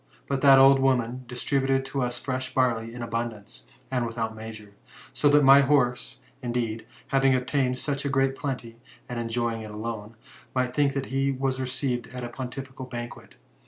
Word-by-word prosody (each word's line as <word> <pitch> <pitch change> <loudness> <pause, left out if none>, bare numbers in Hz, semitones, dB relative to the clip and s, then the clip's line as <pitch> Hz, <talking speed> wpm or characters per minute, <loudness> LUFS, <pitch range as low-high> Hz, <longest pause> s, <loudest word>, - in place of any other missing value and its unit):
But 135 -1 -1
that 135 -1 +8
old 135 0 +7
woman 125 -1 +1
distributed 135 +2 0
to 135 0 -3
us 125 0 -1
fresh 130 +1 -4
barley 115 -3 +1
in 120 0 -6
abundance, 115 -3 -5 0.3
and 125 -2 +1
without' 115 -1 -3
measure; 110 -2 -9 0.4
so 145 - +3
that 145 0 +5
my 135 +1 +8
horse, 130 -3 +1 0.2
indeed, 120 -2 -2 0.2
having 135 -1 +4
obtained 130 0 0
such 140 0 -1
great 135 0 +2
plenty, 125 -5 -5 0.3
and 120 -1 -4
enjoying 115 0 -1
it 110 - -8
alone, 110 +1 -6 0.4
might 130 -1 0
think 140 0 +2
that 135 -1 -2
he 135 +1 +2
was 130 0 -1
received 125 -1 -2
at 125 - -5
a 120 - -4
pontifical 130 +1 -7
ban 120 -1 -5
quet. - - -14
125 Hz, 170 wpm, -26 LUFS, 120-135 Hz, 0.4 s, that